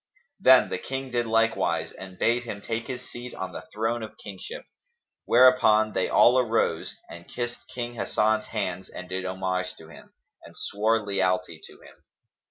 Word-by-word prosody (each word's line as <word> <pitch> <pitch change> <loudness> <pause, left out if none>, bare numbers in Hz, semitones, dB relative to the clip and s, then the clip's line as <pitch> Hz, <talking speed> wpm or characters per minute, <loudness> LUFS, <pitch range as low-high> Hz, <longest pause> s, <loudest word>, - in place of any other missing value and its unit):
Then - - +6
the - - -3
King 135 -1 -5
did 120 -1 0
likewise 115 0 +1
and 95 -1 -11
bade 120 +5 +2
him 115 -4 -6
take 115 +2 -4
his 125 -1 -6
seat 120 +1 -8
on 95 -1 -5
the - - -9
throne 115 +2 -1
of 110 - -8
kingship; 100 -3 -8 0.6
whereupon 115 -4 +5
they 95 - 0
all 125 +2 +6
arose 115 -9 0
and 85 0 -11
kissed 120 -1 -5
King 120 -1 -5
Hasan's 110 -1 0
hands 95 -4 -3
and 90 - -8
did 95 0 -3
homage 95 0 -2
to 80 - -14
him, - - -15 0.3
and - - -15
swore 110 +1 0
lealty 90 -4 0
to - - -15
him. - - -18
110 Hz, 170 wpm, -26 LUFS, 95-120 Hz, 0.6 s, Then